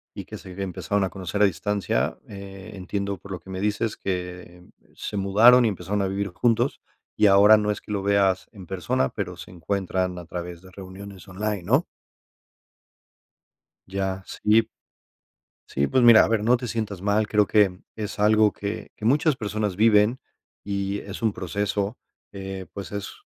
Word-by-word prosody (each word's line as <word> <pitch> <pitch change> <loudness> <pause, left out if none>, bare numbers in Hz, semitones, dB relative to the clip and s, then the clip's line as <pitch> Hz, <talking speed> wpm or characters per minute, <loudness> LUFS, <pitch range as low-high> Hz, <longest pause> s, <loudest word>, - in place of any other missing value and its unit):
y - - -7
que - - -8
se 95 - -11
empezaron 95 +1 -1
a 95 - 0
conocer 95 +1 -4
a - - +8
distancia, 100 0 -1
eh, 100 -1 -10
entiendo, 100 +1 -3
por 95 +3 -13
lo 90 - -4
que 95 - -17
me 95 0 -5
dices, 105 +1 -1
que 90 -1 -5 0.3
se 105 - -5
mudaron 115 +6 +6
y - - +4
empezaron 100 +1 -2
a - - 0
vivir 100 +1 -2
juntos, 120 +7 +1 0.3
y - - +3
ahora 100 +2 +7
no 105 0 0
es 105 - -4
que - - -10
lo 100 -2 -2
veas 100 -2 +2
en 95 -5 -12
persona, 85 -8 0
pero - - -5
se - - -10
encuentran 90 0 -2
a 85 - -10
través 85 0 -7
de 95 - -15
reuniones 95 0 -10
online, 100 0 -3
¿no? 130 - +2 2.0
Ya, 95 0 -3
sí. 110 +2 +2 1.1
Sí, 70 +1 0
pues, 130 -1 +2
mira, 115 -2 +9
a - - +1
ver, 110 -2 +1
no 125 +3 +4
te 125 - -6
sientas 105 -5 -3
mal, 105 +2 +1
creo 105 -1 +3
que 100 -4 +3 0.2
es 105 -1 -5
algo 105 0 +4
que 100 +2 -6
que 110 - -8
muchas 145 +5 +3
personas 105 -2 -2
viven 110 +3 +4 0.4
y 100 0 -2
es 100 0 -8
un 110 -2 +2
proceso, 100 +4 -2 0.4
eh, 95 -1 -6
pues, 100 - -7
es 100 -1 -5
100 Hz, 175 wpm, -24 LUFS, 95-105 Hz, 2.0 s, mira